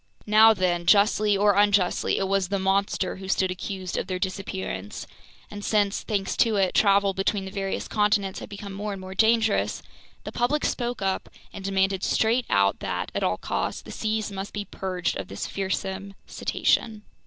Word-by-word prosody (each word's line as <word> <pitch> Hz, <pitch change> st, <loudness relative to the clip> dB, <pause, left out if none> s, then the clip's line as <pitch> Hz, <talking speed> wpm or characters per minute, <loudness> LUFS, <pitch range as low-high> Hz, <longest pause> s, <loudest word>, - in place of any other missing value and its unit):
Now 220 Hz, +1 st, +6 dB
then, 175 Hz, -2 st, 0 dB
justly 205 Hz, +1 st, +4 dB
or 205 Hz, +1 st, +4 dB
unjustly, 200 Hz, -2 st, +2 dB
it 195 Hz, -, 0 dB
was 195 Hz, -1 st, +1 dB
the 200 Hz, +2 st, -1 dB
"monster" 195 Hz, +1 st, 0 dB
who 190 Hz, 0 st, -8 dB
stood 190 Hz, -1 st, +1 dB
accused 185 Hz, 0 st, -5 dB
of -, -, -2 dB
their 185 Hz, -, -2 dB
disappearance; 185 Hz, -, -4 dB, 0.5 s
and 205 Hz, 0 st, -7 dB
since, 205 Hz, -2 st, +1 dB
thanks 200 Hz, -3 st, -2 dB
to 225 Hz, -2 st, +3 dB
it, 195 Hz, -2 st, +2 dB
travel 200 Hz, -1 st, +4 dB
between 195 Hz, +1 st, -1 dB
the 190 Hz, -, -7 dB
various 195 Hz, -1 st, -3 dB
continents 210 Hz, -2 st, +1 dB
had -, -, -9 dB
become 200 Hz, -1 st, -8 dB
more 205 Hz, +1 st, -4 dB
and 195 Hz, -, -7 dB
more 185 Hz, 0 st, -8 dB
dangerous, 220 Hz, +1 st, +2 dB, 0.4 s
the -, -, -6 dB
public 265 Hz, +5 st, 0 dB
spoke 240 Hz, -4 st, -2 dB
up 190 Hz, -1 st, -1 dB, 0.2 s
and 195 Hz, -, -8 dB
demanded 195 Hz, 0 st, 0 dB
straight 230 Hz, +3 st, +1 dB
out 100 Hz, 0 st, +2 dB
that, -, -, -3 dB
at -, -, -2 dB
all -, -, +1 dB
cost, -, -, -3 dB
the -, -, -9 dB
seas 215 Hz, -1 st, -2 dB, 0.2 s
be 205 Hz, -1 st, -4 dB
purged 185 Hz, -3 st, -3 dB
of 95 Hz, -, -5 dB
this 95 Hz, -, -5 dB
fearsome 195 Hz, 0 st, -3 dB
cetacean. 215 Hz, -2 st, 0 dB
195 Hz, 175 wpm, -25 LUFS, 190-210 Hz, 0.5 s, Now